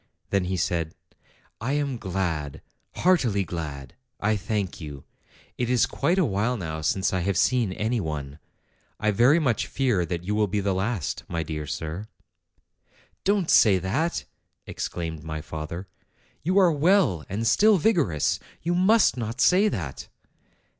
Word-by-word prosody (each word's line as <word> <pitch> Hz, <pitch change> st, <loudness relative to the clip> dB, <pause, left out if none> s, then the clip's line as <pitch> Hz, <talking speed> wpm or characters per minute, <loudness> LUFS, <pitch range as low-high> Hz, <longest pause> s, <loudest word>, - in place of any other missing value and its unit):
Then 100 Hz, -2 st, +2 dB
he 95 Hz, +1 st, -2 dB
said, 85 Hz, -2 st, -1 dB, 0.7 s
"I 130 Hz, +5 st, -1 dB
am 140 Hz, -4 st, -1 dB
glad, 85 Hz, -7 st, -3 dB, 0.3 s
heartily 130 Hz, -, +2 dB
glad. 75 Hz, -6 st, -6 dB, 0.3 s
I 110 Hz, +1 st, +1 dB
thank 100 Hz, -3 st, -3 dB
you. 70 Hz, -3 st, -8 dB, 0.6 s
It 120 Hz, -1 st, 0 dB
is 125 Hz, -1 st, +4 dB
quite 165 Hz, +7 st, 0 dB
a 185 Hz, -, +4 dB
while 110 Hz, +2 st, 0 dB
now 80 Hz, -5 st, -4 dB
since 95 Hz, +6 st, 0 dB
I 95 Hz, -, +1 dB
have 95 Hz, +2 st, 0 dB
seen 125 Hz, -6 st, +2 dB
any 115 Hz, +5 st, -1 dB
one. 75 Hz, -4 st, -5 dB, 0.6 s
I 105 Hz, 0 st, +2 dB
very 120 Hz, +9 st, +5 dB
much 130 Hz, -9 st, +1 dB
fear 125 Hz, -9 st, +1 dB
that 85 Hz, -1 st, -3 dB
you 100 Hz, +4 st, -2 dB
will 105 Hz, 0 st, +2 dB
be 105 Hz, +2 st, -1 dB
the 100 Hz, -1 st, 0 dB
last, 95 Hz, -, -2 dB
my 85 Hz, -1 st, -2 dB
dear 75 Hz, -1 st, -5 dB
sir." 80 Hz, +8 st, -5 dB, 1.2 s
"Don't 195 Hz, -3 st, +2 dB
say 100 Hz, -4 st, +6 dB
that," 110 Hz, -, -1 dB, 0.4 s
exclaimed 80 Hz, -3 st, -5 dB
my 80 Hz, -1 st, -4 dB
father. 80 Hz, +4 st, -6 dB, 0.5 s
'You 185 Hz, +6 st, +1 dB
are 185 Hz, -3 st, +6 dB
well 155 Hz, -, +3 dB
and 110 Hz, +4 st, -2 dB
still 210 Hz, -, +5 dB
vigorous. 155 Hz, -, +1 dB, 0.2 s
You 170 Hz, +2 st, 0 dB
must 190 Hz, -, +4 dB
not 115 Hz, +1 st, -4 dB
say 185 Hz, +8 st, +5 dB
that." 80 Hz, -, -4 dB
100 Hz, 155 wpm, -25 LUFS, 85-130 Hz, 1.2 s, say